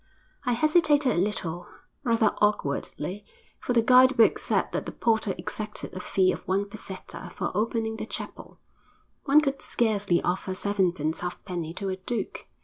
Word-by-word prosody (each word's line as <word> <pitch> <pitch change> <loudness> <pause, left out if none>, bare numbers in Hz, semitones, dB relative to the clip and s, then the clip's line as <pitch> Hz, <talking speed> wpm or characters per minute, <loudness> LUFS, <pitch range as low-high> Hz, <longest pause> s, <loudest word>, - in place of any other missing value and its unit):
I 245 - +2
hesitated 300 0 +4
a 175 - +1
little, 175 -4 -3 0.4
rather 230 -4 +3
awkwardly, 195 -1 -1 0.4
for 245 - -2
the 230 -1 +4
guide 255 +2 +6
book 225 - +5
said - - 0
that - - -3
the - - -3
porter 220 -4 +1
exacted 215 -1 -6
a 185 - -5
fee 185 0 +2
of - - -4
one 195 +2 +1
peseta 200 -2 -8
for - - -2
opening 220 +2 -1
the 220 - -5
chapel - - -7 0.7
one 295 +1 +6
could 275 -2 -2
scarcely 205 -6 +1
offer 185 +1 -1
sevenpence 180 -6 0
halfpenny 175 -2 -5
to 195 0 -3
a 185 - -2
duke. 225 +5 -4
210 Hz, 155 wpm, -27 LUFS, 185-235 Hz, 0.7 s, guide